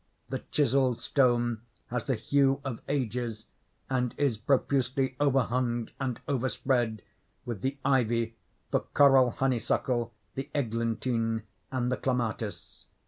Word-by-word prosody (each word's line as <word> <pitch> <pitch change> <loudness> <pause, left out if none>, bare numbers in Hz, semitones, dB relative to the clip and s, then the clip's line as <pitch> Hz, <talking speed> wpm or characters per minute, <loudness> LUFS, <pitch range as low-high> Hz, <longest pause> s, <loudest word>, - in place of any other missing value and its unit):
The 130 0 -2
chiselled 130 -3 +2
stone 120 -4 +2 0.3
has 125 -1 -2
the 135 - +1
hue 135 +4 +2
of 125 -5 -4
ages, 120 -5 -2 0.4
and 125 -2 0
is 140 -5 +2
profusely 130 +2 +1
overhung 125 -4 +1
and 130 -3 -2
overspread 125 -4 0 0.4
with 115 -6 -4
the 135 +2 -1
ivy, 115 -3 +2 0.4
the - - +3
coral 135 -3 +5
honeysuckle, 120 -1 0 0.2
the 135 +2 -5
eglantine, 115 -2 0 0.3
and 125 -1 0
the - - +1
clematis. 125 -5 -3
125 Hz, 115 wpm, -29 LUFS, 115-135 Hz, 0.4 s, coral